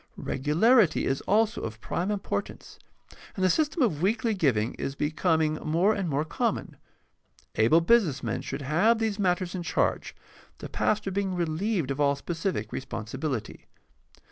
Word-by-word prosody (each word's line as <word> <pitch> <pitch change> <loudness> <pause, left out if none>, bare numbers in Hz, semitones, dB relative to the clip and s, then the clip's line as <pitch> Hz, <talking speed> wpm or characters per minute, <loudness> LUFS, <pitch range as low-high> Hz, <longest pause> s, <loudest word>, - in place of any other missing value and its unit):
Regularity 180 - +3
is 135 - -1
also 220 +2 +2
of 110 0 -6
prime 175 - -3
importance, 205 -2 -4 0.6
and 185 - 0
the 185 - +4
system 310 -1 +1
of 165 -11 0
weekly 220 +4 +1
givmg 130 - +1
is 135 - -3
be 150 +2 -1
coming 160 -2 +1
more 170 +7 +2
and 195 -5 -2
more 145 +2 0
common. 155 - -2 0.8
Able 115 +10 +4
business 165 - +3
men - - -2
should 140 +2 -5
have 175 - +3
these 220 -2 -2
matters 180 -2 0
in 185 - -3
charge, 165 -1 -1 0.4
the - - -8
pastor 210 -2 0
being 190 -1 -1
reheved 170 - -1
of 140 - -4
all 140 0 +3
specific 165 - -3
responsibility. 120 +1 -5
170 Hz, 150 wpm, -27 LUFS, 145-205 Hz, 0.8 s, the